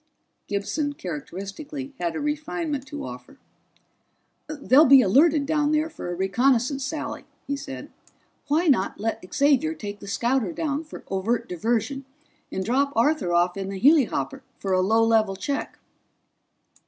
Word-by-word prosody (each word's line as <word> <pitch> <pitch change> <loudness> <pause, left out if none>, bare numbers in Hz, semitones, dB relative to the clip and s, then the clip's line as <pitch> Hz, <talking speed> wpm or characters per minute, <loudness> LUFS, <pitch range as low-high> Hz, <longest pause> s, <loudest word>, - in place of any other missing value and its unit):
Gibson, 285 +9 -2
characteristically, 200 - -7
had 170 -2 -2
a - - -2
refinement 295 -1 -3
to 290 +1 -6
offer. - - -10 1.1
"They'll 295 -1 +4
be 270 -1 +8
alerted 285 - +4
down 300 0 +1
there 310 +1 +1
for 300 - -7
a 175 - -3
reconnaissance 250 - +1
sally," 295 +1 -4 0.2
he 280 - -2
said. 135 - -8 0.6
"Why 310 +4 +2
not 235 - +2
let 225 +2 -2
Xavier 290 +3 +2
take 205 -5 -7
the 200 - -11
scouter 235 -2 0
down 305 0 -2
for 305 - -10
overt 205 +5 -1
diversion, 230 - -1 0.5
and 190 - -3
drop 275 +4 +1
Arthur 235 - +2
off 175 +1 +2
in 195 -1 -4
the 195 -1 -5
helihopper 255 - +3 0.2
for 195 -1 -2
a 185 - +3
low 220 +4 +3
level 220 -3 +3
check?" 280 +9 -4
260 Hz, 145 wpm, -25 LUFS, 195-290 Hz, 1.1 s, be